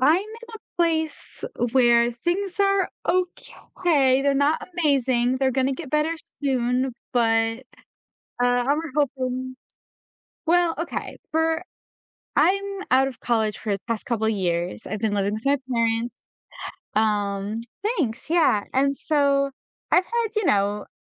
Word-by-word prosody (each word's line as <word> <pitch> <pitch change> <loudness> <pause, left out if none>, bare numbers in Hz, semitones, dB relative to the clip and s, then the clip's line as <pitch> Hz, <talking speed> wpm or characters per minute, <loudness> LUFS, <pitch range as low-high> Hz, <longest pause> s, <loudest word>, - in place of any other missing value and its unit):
I'm 300 +6 +5
in - - -11 0.3
a - - -8 0.2
place 320 -2 -2 0.3
where 240 -2 +5
things 350 - -2
are 395 -1 +3 0.2
okay, 335 -6 +1
they're 280 -1 +2
not 285 +3 +2 0.2
amazing. 260 -5 +2
They're 265 0 +2
gonna 265 +1 +1
get 280 -1 -8
better 305 +2 +1 0.3
soon, 255 -1 +1 0.2
but 225 -1 +2 0.8
uh - - +4 0.2
I 280 - +3
was 315 0 -3
hoping 255 -3 -1 0.9
well, 345 0 +3
okay. 335 +1 -4 0.2
For 320 +1 +1 0.7
I'm 395 +2 +3 0.3
out 265 +1 +5
of 260 -3 -8
college 220 -3 0
for 210 - -2
the 200 - -2
past 230 -2 -2
couple 220 -2 0
years. 180 -2 -1
I've 215 - -4
been 215 -1 0
living 200 0 0
with 215 +3 -6
my 280 +1 +4 0.2
parents, 230 0 0 0.8
um 205 -1 0 0.4
thanks, 235 -5 -2
yeah. 320 -12 +3
And 275 +1 +2
so 280 -2 +2 0.4
I've 360 - +5
had, 470 +2 0
you 430 -3 +1
know, 205 -1 +1
260 Hz, 135 wpm, -24 LUFS, 225-315 Hz, 0.9 s, I'm